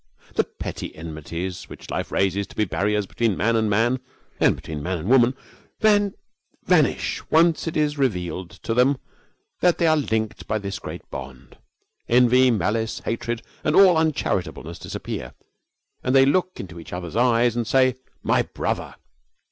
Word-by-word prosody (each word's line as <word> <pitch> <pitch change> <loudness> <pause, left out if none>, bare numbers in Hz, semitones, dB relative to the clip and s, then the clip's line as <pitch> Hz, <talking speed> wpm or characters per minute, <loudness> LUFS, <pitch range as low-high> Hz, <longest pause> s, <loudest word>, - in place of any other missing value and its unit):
The - - +2
petty - - -7
enmities 85 +3 -6
which - - -10
life - - -3
raises 95 +1 +1
to - - -15
be 105 - +1
barriers 105 +2 0
between 110 0 0
man 115 +4 +2
and 110 -1 +2
man 115 +5 +2 0.4
and - - +4
between 75 -2 -7
man 90 +4 -2
and 80 +3 -6
woman 125 +1 +5 0.4
vanish 205 -2 +1
once 165 +1 +3
it 160 - -2
is 150 -1 0
revealed 90 -8 -1
to 115 - -1
them 130 +4 +3 0.6
that 175 -1 +3
they 170 - +2
are 160 -1 +5
linked 110 - -2
by 110 - 0
this 100 -3 -5
great - - -8
bond. 65 -1 -9 0.5
Envy, 125 +1 +5
malice, 110 +1 0
hatred, 115 0 -3 0.2
and 150 - +1
all 190 -3 +7
uncharitableness 155 - -1
disappear, - - -6 0.7
and 130 +1 +1
they 135 0 +7
look 185 +6 +1
into 90 -3 -8
each 85 - -10
other's 90 -1 -5
eyes 120 0 +3
and 120 -2 -1
say 130 -1 +4 0.3
'My - - +3
brother!' - - -3
115 Hz, 155 wpm, -23 LUFS, 95-135 Hz, 0.7 s, all